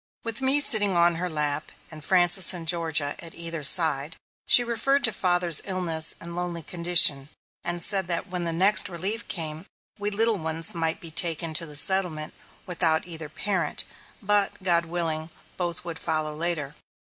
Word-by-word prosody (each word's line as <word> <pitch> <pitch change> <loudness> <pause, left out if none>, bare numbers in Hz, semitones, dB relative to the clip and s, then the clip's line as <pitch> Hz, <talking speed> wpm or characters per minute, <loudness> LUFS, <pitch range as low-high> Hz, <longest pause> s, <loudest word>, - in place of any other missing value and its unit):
With 230 +2 -5
me 265 +2 +3
sitting 205 -9 +4
on 170 0 +2
her 180 +1 -3
lap, 150 -1 +1 0.2
and 155 -1 -11
Frances 180 +1 +4
and 165 -2 -9
Georgia 160 -4 +1
at 165 -1 -8
either 165 -1 -5
side, 155 0 +4 0.3
she 245 - +6
referred 240 +4 -1
to 225 - +1
father's 175 -3 +1
illness 170 -4 -2
and 170 0 -9
lonely 175 -2 -5
condition, 170 -5 +4 0.3
and 175 0 -1
said 190 -2 0
that 175 +2 -3
when 180 -2 -5
the 170 - -3
next 190 +6 +3
"Relief" 190 +6 -5
came, 160 -3 -3 0.3
we 205 0 -3
little 220 0 0
ones 160 0 -2
might 165 -1 -2
be 165 - -6
taken 165 0 +1
to 165 +1 0
the 150 - -7
settlement, 160 -1 +2 0.3
without 165 -3 0
either 165 -3 -7
parent, 180 -1 -3 0.4
but, 205 -1 -1
God 170 -2 0
willing, 165 -2 -4 0.3
both 175 -1 -5
would 170 -2 -7
follow 155 -1 -1
later. 155 -3 -4
170 Hz, 170 wpm, -24 LUFS, 160-185 Hz, 0.4 s, she